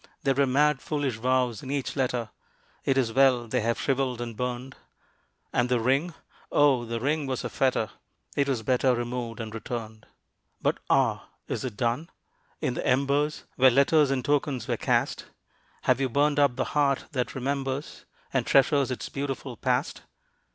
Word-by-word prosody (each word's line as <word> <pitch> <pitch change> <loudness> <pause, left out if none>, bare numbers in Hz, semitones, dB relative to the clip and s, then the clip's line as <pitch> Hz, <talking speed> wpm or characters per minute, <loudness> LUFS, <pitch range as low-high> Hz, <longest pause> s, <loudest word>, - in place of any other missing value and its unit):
There 135 - +3
were 140 +1 +2
mad 145 +2 +3
foolish 145 -6 -2
vows 125 -1 +1
in 130 - -8
each 140 -1 -2
letter, 125 -4 -1 0.5
It 135 - +2
is 120 -4 +1
well 130 -2 +4
they 125 +2 0
have 115 +1 0
shriveled 135 -3 0
and 120 -2 -5
burned, 125 +2 -4 0.8
And 125 0 +2
the 125 -1 +2
ring! 135 +8 +1 0.4
oh, 135 -5 +4
the 115 0 -3
ring 145 +3 0
was 130 -2 -2
a - - -3
fetter, 130 -5 +1 0.4
It 140 -1 +1
was 125 -5 -1
better 130 +1 +2
removed 120 -1 -4
and 110 -1 -5
returned. 110 -1 -6 0.5
But - - 0
ah, - - +2 0.2
is - - -3
it 120 -6 -5
done? 125 +7 -1 0.5
in - - 0
the - - -3
embers 140 +3 +1
Where 130 0 +7
letters 140 +3 +4
and 135 -2 -1
tokens 140 -4 0
were - - +1
cast, - - 0 0.6
Have 130 +1 +2
you 135 - +1
burned 145 +3 +2
up 140 -4 +4
the 130 - 0
heart 140 -2 +2
that 125 -4 -2
remembers, 135 +1 -3 0.3
And - - +2
treasures 140 0 +4
its 130 - -4
beautiful 135 -2 -4
past? 125 +4 -1
130 Hz, 170 wpm, -27 LUFS, 120-140 Hz, 0.8 s, Where